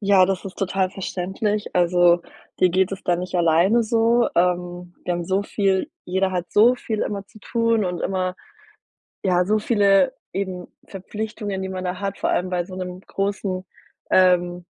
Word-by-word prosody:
Ja, 195 -3 +5
das 195 0 -2
ist 190 - -8
total 190 -1 0
verständlich. 195 +3 -3
Also, 175 -1 +4 0.4
dir 185 - +4
geht 190 +2 +2
es 195 - -6
da 175 - +2
nicht 180 +1 -6
alleine 175 +7 +4
so. 230 +2 +3
Ähm, 175 0 -1
wir 175 - -1
haben 175 -1 -2
so 190 +3 0
viel 195 -2 0
jeder 190 +1 0
hat 180 -1 -2
so 235 +4 +5
viel 220 -3 -4
immer 200 -1 -3
zu 215 - -17
tun 230 -1 +1
und 180 -2 -3
immer, 185 -1 -1 0.9
ja, 180 -2 +2
so 215 +3 +2
viele 205 +3 +3 0.2
eben 185 -2 -4 0.2
Verpflichtungen, 205 0 -5
die 190 - -3
man 185 -1 -5
da 180 +1 -3
hat, 200 -1 -3
vor - - 0
allem 180 +1 0
bei 175 -1 0
so 185 +1 -10
'nem 180 0 -6
großen 195 -1 -3 0.5
ähm, 180 -1 +3
190 Hz, 175 wpm, -22 LUFS, 180-205 Hz, 0.9 s, Ja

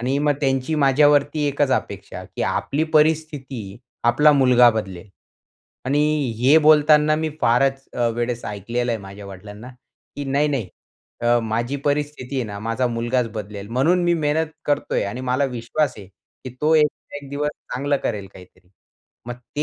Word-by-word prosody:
आणि 130 +4 0
मग 145 0 +2
त्यांची 135 +2 0
माझ्यावरती 145 +1 +3
एकच 140 -1 0
अपेक्षा - - -4
की - - -6
आपली 150 +3 -1
परिस्थिती 150 -4 +1 0.5
आपला 150 +5 +5
मुलगा 125 -3 +5
बदलेल. 100 -4 -5 0.8
आणि 140 +3 +1 0.4
हे 135 +6 +5
बोलताना 150 0 +5
मी 160 0 -2
फारच 135 +3 +2
अ, 120 -1 +1
वेळेस 120 0 -3
ऐकलेलं 115 +4 -3
आहे 110 - -2
माझ्या 100 +1 -10
वडिलांना 105 +5 -10 0.5
की 145 - -4
नाही-नाही 140 -6 0 0.5
अ, 120 0 +3
माझी 115 +5 -2
परिस्थिती 145 -2 -2
आहे 130 - 0
ना 100 -2 -7
माझा 115 +4 -1
मुलगाच 120 +1 -1
बदलेल. 105 -1 -7
म्हणून 155 +10 +2
मी 175 - +3
मेहनत 155 0 0 0.2
करतोय 145 - 0
आणि 105 +6 -5
मला 130 +2 0
विश्वास 130 +4 -2
आहे 100 - -10 0.4
की 130 - -6
तो 155 +2 +3
एक-एक 145 -2 -1
दिवस 145 +1 -1 0.2
चांगलं 140 +3 0
करेल 100 -3 -3
काहीतरी. 90 -1 -17 0.6
मग 120 - -5 0.2
ते 150 - +1
135 Hz, 155 wpm, -21 LUFS, 115-150 Hz, 0.8 s, आपला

